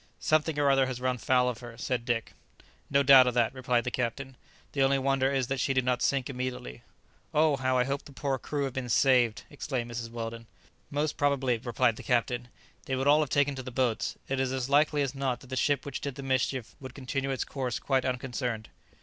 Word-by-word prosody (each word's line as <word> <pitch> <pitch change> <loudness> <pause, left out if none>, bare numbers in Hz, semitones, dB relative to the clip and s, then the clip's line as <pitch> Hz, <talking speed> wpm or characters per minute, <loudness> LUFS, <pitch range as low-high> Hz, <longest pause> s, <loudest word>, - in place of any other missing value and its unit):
"Something 155 0 +1
or 145 -1 +4
other 135 -1 +3
has 130 -2 -4
run 125 -1 -1
foul 125 0 +3
of 120 -2 -2
her," 120 -2 -10
said 120 0 -2
Dick. 120 -3 -1 0.6
"No 140 0 +3
doubt 130 -2 +8
of 125 - 0
that," 120 -1 +2
replied 125 -2 0
the 125 - -3
captain; 130 +2 -3 0.4
"the 140 - -1
only 135 0 +4
wonder 135 0 +1
is 135 -2 +1
that 135 +2 -2
she 135 +1 0
did 130 -1 +2
not 125 -1 +1
sink 135 -3 +1
immediately." 125 - -5 0.5
"Oh, 155 -1 +4
how 130 -1 0
I 125 - +4
hope 140 +2 -3
the - - -12
poor 135 0 -2
crew 145 +2 -3
have 135 -2 -3
been 125 -2 -4
saved!" 125 -3 +3
exclaimed 130 -5 -4
Mrs 115 0 -5
Weldon. 115 0 -6 0.4
"Most 145 +1 -1
probably," 135 -4 +1
replied 120 -1 +1
the - - -7
captain, 120 -1 0 0.4
"they 130 - 0
would 130 +1 -1
all 145 +2 +6
have 150 -3 0
taken 145 0 +2
to 135 - -5
the 130 - -7
boats. 125 -3 0
It 135 0 -1
is 130 -1 0
as 130 0 -3
likely 145 0 +4
as 135 - -2
not 135 -3 -2
that 130 - -15
the - - -2
ship 140 +1 +1
which 140 - -5
did 140 -2 -4
the 140 - -7
mischief 130 -2 -1
would 130 -2 -9
continue 135 0 -3
its 135 -2 -1
course 130 -4 -3
quite 135 -2 0
unconcerned." 125 -3 -3
130 Hz, 225 wpm, -29 LUFS, 125-140 Hz, 0.6 s, doubt